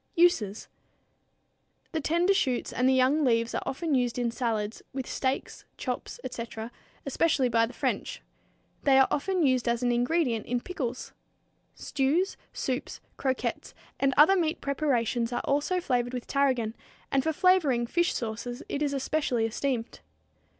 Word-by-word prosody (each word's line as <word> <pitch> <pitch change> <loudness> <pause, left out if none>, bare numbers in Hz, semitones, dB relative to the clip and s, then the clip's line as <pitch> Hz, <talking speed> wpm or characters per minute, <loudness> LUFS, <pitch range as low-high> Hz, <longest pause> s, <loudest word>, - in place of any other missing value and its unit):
Uses. 245 - +2 1.2
The 320 - -1
tender 340 +6 +3
shoots 255 -10 0
and 255 +1 +2
the - - +4
young 260 +4 +3
leaves 230 -3 +2
are - - -1
often 310 +3 -2
used 245 -3 +1
in 240 -1 0
salads, 225 -3 -2
and - - -32
with 265 -1 -3
steaks, 265 0 -2
chops, - - -4
etc., 230 -2 -6 0.3
especially 275 -2 +2
by 230 0 +3
the 245 - -10
French. - - -2 0.6
They 275 -2 +4
are 265 - +6
often 365 +2 +1
used 255 -2 +2
as 235 +1 +1
an 245 - +2
ingredient 245 -1 +1
in 245 0 0
pickles. 255 -6 -5 0.6
Stews, 305 +8 0 0.2
soups, 255 -1 -3 0.2
croquettes, 260 -1 -2 0.2
and 275 -1 +2
other 315 +7 +7
meat 335 -2 0
preparations 250 -5 0
are 240 - -1
also 295 +6 0
flavored 245 -6 -1
with 245 - -4
tarragon, 255 -6 +1 0.4
and 275 - +3
for 320 - +1
flavoring 310 -8 +3
fish 345 +8 +1
sauces 235 +2 -4
it 285 - -3
is 290 -2 0
especially 270 -4 0
esteemed. 235 +1 -2
260 Hz, 150 wpm, -28 LUFS, 240-300 Hz, 1.2 s, other